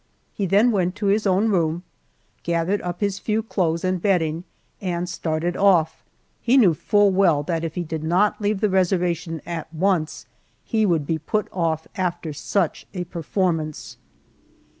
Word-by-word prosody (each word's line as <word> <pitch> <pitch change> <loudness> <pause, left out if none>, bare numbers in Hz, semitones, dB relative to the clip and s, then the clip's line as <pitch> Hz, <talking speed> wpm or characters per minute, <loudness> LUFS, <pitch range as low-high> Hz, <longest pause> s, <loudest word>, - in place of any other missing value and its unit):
He 200 - -2
then 205 +7 +4
went 185 -3 0
to 205 0 -4
his 215 0 0
own 195 +4 +2
room, 170 -3 0 0.6
gathered 170 +4 0
up 175 +1 -5
his 200 -1 0
few 220 0 -1
clothes 170 -6 -1
and 185 -1 0
bedding, 170 -4 +1 0.4
and 175 -2 -2
started 170 0 -2
off. 175 -5 +3 0.4
He 245 +3 +3
knew 200 -10 +6
full 205 +5 +3
well 180 -6 +3
that 165 +1 -2
if 165 -1 -4
he 180 - -2
did 160 -1 -5
not 185 +7 +2
leave 205 -1 0
the 210 - +2
reservation 175 -3 0
at 165 -2 -5
once 165 -1 0 0.4
he 220 -3 +1
would 165 -5 +1
be 160 +2 -1
put 210 +7 -1
off 165 -3 -1
after 175 -4 -2
such 195 +7 -1
a 180 - -2
performance. 165 -2 -2
180 Hz, 160 wpm, -23 LUFS, 165-200 Hz, 0.6 s, knew